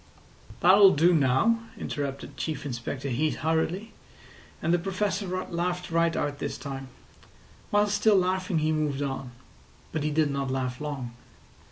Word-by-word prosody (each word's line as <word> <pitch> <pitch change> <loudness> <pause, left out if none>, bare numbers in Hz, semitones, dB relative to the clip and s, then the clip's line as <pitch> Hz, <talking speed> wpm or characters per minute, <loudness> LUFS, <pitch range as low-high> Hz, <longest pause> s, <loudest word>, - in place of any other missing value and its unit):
"That'll 190 +1 +7
do 170 +4 +5
now," 145 - +3 0.2
interrupted 140 -1 -4
Chief 155 -3 -4
Inspector 130 +1 -4
Heat 140 +5 0
hurriedly; 165 +7 -1 0.7
and 165 - +1
the 175 - +3
Professor 195 +2 -1
laughed 180 -1 -3
right 165 0 +2
out 145 -1 -2
this - - -3
time. 135 -2 -6 0.8
While 205 0 +4
still 210 +1 +3
laughing 185 -1 +1
he 155 0 +1
moved 150 -2 0
on; 135 -2 -4 0.6
but 160 - -2
he 150 - +1
did 150 -1 +2
not 140 -1 -2
laugh 130 -1 -2
long. 140 -5 -4
155 Hz, 145 wpm, -27 LUFS, 140-185 Hz, 0.8 s, That'll